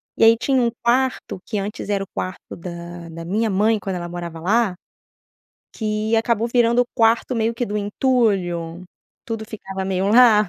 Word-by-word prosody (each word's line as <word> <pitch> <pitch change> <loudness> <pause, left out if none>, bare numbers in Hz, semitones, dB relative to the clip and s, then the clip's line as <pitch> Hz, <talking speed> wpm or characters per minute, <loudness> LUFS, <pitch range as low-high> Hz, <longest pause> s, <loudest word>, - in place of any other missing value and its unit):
e - - +2
aí 225 +1 +7
tinha 265 +2 +2
um 235 - +3
quarto 250 -4 +1
que 215 - -3
antes 205 +1 -5
era 200 -1 +1
o - - -10
quarto 185 0 -5
da 170 0 -8
da 165 0 -8
minha 215 +6 0
mãe 215 +3 +3
quando 195 -2 -4
ela 175 -1 -5
morava 170 -1 -6
lá, 200 +3 +2 1.0
que 215 0 -1
acabou 230 0 +1
virando 240 0 +4
o - - -7
quarto 230 +2 +3
meio 225 0 +1
que 245 - -1
do 210 - -3
entulho? 200 -7 0 0.4
Tudo 225 -1 -4
ficava 195 -3 -6
meio 190 0 0
lá. 215 -3 +6
210 Hz, 175 wpm, -21 LUFS, 185-230 Hz, 1.0 s, aí